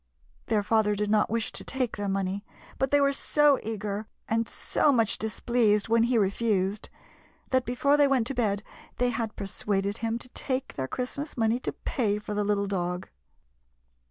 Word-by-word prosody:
Their 210 Hz, -2 st, +2 dB
father 210 Hz, -1 st, +2 dB
did 210 Hz, 0 st, -1 dB
not 215 Hz, -1 st, +3 dB
wish 230 Hz, 0 st, -1 dB
to -, -, -6 dB
take 260 Hz, -3 st, -2 dB
their 205 Hz, -1 st, -2 dB
money, 195 Hz, +1 st, -1 dB, 0.4 s
but 265 Hz, -, +1 dB
they 285 Hz, -, +4 dB
were 280 Hz, 0 st, +3 dB
so 295 Hz, 0 st, +3 dB
eager, 210 Hz, -1 st, -4 dB, 0.2 s
and 230 Hz, 0 st, 0 dB
so 295 Hz, -, +1 dB
much 230 Hz, -5 st, +2 dB
displeased 220 Hz, 0 st, +1 dB
when 230 Hz, 0 st, +4 dB
he 240 Hz, 0 st, +2 dB
refused, 200 Hz, -1 st, 0 dB, 0.6 s
that 260 Hz, -1 st, +2 dB
before 280 Hz, +4 st, +2 dB
they 290 Hz, -1 st, +5 dB
went 265 Hz, -4 st, +2 dB
to 275 Hz, -, -2 dB
bed 210 Hz, -5 st, 0 dB, 0.3 s
they 245 Hz, 0 st, +2 dB
had 225 Hz, -2 st, -3 dB
persuaded 200 Hz, +1 st, -2 dB
him 230 Hz, 0 st, -1 dB
to 245 Hz, -, -8 dB
take 260 Hz, +1 st, -3 dB
their 130 Hz, -1 st, -3 dB
Christmas 270 Hz, -, -4 dB
money 225 Hz, +1 st, +2 dB
to -, -, -3 dB
pay 210 Hz, -5 st, -1 dB
for 210 Hz, 0 st, -5 dB
the 210 Hz, 0 st, 0 dB
little 200 Hz, 0 st, +1 dB
dog. 180 Hz, -2 st, -2 dB
220 Hz, 180 wpm, -28 LUFS, 205-250 Hz, 0.6 s, they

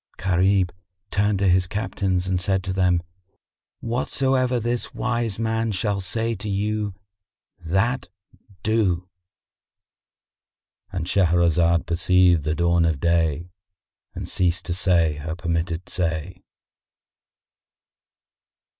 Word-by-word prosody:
Gharib 95 Hz, 0 st, +2 dB, 0.4 s
turned 100 Hz, 0 st, +2 dB
to 100 Hz, 0 st, +1 dB
his 90 Hz, 0 st, +3 dB
Captains 95 Hz, -2 st, -1 dB
and 90 Hz, -1 st, 0 dB
said 95 Hz, 0 st, +1 dB
to 95 Hz, 0 st, -3 dB
them, 90 Hz, -2 st, +2 dB, 0.8 s
"Whatsoever 130 Hz, +1 st, 0 dB
this 120 Hz, +1 st, -3 dB
wise 120 Hz, -4 st, -1 dB
man 115 Hz, 0 st, -1 dB
shall 100 Hz, 0 st, -1 dB
say 115 Hz, +5 st, -1 dB
to 105 Hz, +2 st, -5 dB
you 105 Hz, 0 st, -1 dB, 0.6 s
that 95 Hz, +10 st, 0 dB, 0.5 s
do."——And 95 Hz, -2 st, -6 dB
Shahrazad 85 Hz, -2 st, +2 dB
perceived 90 Hz, -2 st, +3 dB
the 80 Hz, 0 st, 0 dB
dawn 85 Hz, 0 st, +2 dB
of 80 Hz, -4 st, +1 dB
day 85 Hz, 0 st, +1 dB, 0.6 s
and -, -, -5 dB
ceased 90 Hz, -1 st, 0 dB
to 90 Hz, -, -2 dB
say 85 Hz, -5 st, +2 dB
her 80 Hz, +2 st, -5 dB
permitted 85 Hz, 0 st, -2 dB
say. 85 Hz, +1 st, -3 dB
90 Hz, 100 wpm, -23 LUFS, 85-105 Hz, 0.8 s, his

